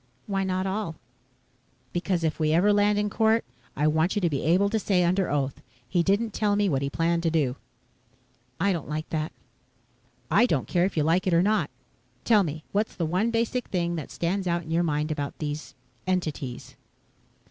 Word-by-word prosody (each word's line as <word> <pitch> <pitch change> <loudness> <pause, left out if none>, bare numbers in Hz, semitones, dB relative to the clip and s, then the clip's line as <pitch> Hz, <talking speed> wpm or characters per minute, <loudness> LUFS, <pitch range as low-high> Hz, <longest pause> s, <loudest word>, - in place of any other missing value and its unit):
"Why 195 -1 -1
not 185 0 -1
all?" 195 -3 -2 1.0
"Because 175 -1 0
if 160 0 -1
we 155 0 +2
ever 195 +5 +4
land 205 0 +3
in 210 0 +1
court. 220 +2 +2 0.3
I 150 - 0
want 160 +5 +2
you 205 - +1
to 170 -3 +1
be 140 - -1
able 180 +6 +3
to 220 - +1
say 190 -3 +2
under 185 +2 +1
oath, 140 -2 -1 0.3
'He 175 +6 +2
didn't 200 +4 +1
tell 205 -1 +1
me 205 0 +2
what 135 -7 +1
he 140 - -1
planned 170 +3 +1
to 165 - +1
do.'" 145 -6 +1 1.0
"I 195 +2 +2
don't 165 -4 -5
like 155 +1 -3
that." 155 0 -1 1.0
"I 245 - +5
don't 140 - 0
care 175 0 +2
if 190 - -3
you 155 - +3
like 170 +5 +2
it 175 - +3
or 170 - +4
not. 205 -7 +2 0.5
Tell 220 -3 +5
me, 155 -3 -3
what's 210 +2 0
the 170 - -1
one 185 +8 +1
basic 235 +2 -1
thing 175 -2 -1
that 155 -4 -5
stands 185 +3 -2
out 170 0 0
in 160 - -8
your 165 +1 +2
mind 155 -2 0
about 145 -2 -3
these 150 0 -5 0.3
entities?" 155 -9 -3
175 Hz, 200 wpm, -26 LUFS, 155-200 Hz, 1.0 s, I